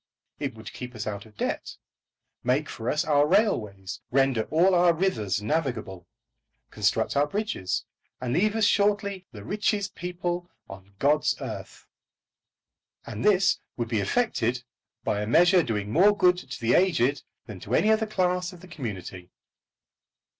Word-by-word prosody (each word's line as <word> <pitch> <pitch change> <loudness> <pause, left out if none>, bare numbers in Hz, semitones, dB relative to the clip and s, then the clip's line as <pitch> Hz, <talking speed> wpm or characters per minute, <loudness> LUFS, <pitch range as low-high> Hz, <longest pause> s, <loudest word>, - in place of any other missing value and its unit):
It 135 -5 -3
would 110 -1 -10
keep 125 -1 -8
us 105 - -5
out 100 0 -5
of 105 - -22
debt, - - -3 0.7
make 135 +4 +1
for 115 +2 -4
us 155 +3 0
our 145 -1 +3
railways, 105 - 0
render 135 -4 +2
all 175 +5 +4
our 175 -1 +5
rivers 110 - -1
navigable, 115 - -2 0.6
construct - - 0
our 145 +1 +3
bridges, 170 - -2 0.3
and 125 -1 -2
leave 210 +4 +2
us 220 -2 +3
shortly 200 -2 +1
the - - -10
richest 205 -1 -1
people 175 0 -4 0.2
on 95 +1 -12
God's 150 +5 +2
earth! - - -7 1.2
And 105 - -6
this 195 -3 +4 0.2
would 120 -2 -2
be 110 -3 0
effected 125 - 0 0.4
by 105 - -1
a 105 - -3
measure 175 - +5
doing 105 -7 -3
more 205 - +5
good 180 -2 +4
to 130 -6 -8
the 115 0 +1
aged 150 -7 +3 0.2
than 105 -5 -9
to 110 +7 -2
any 215 - +4
other 220 0 +2
class 180 -3 0
of 175 - -14
the 185 - -13
community! 100 - -7
145 Hz, 155 wpm, -26 LUFS, 110-185 Hz, 1.2 s, our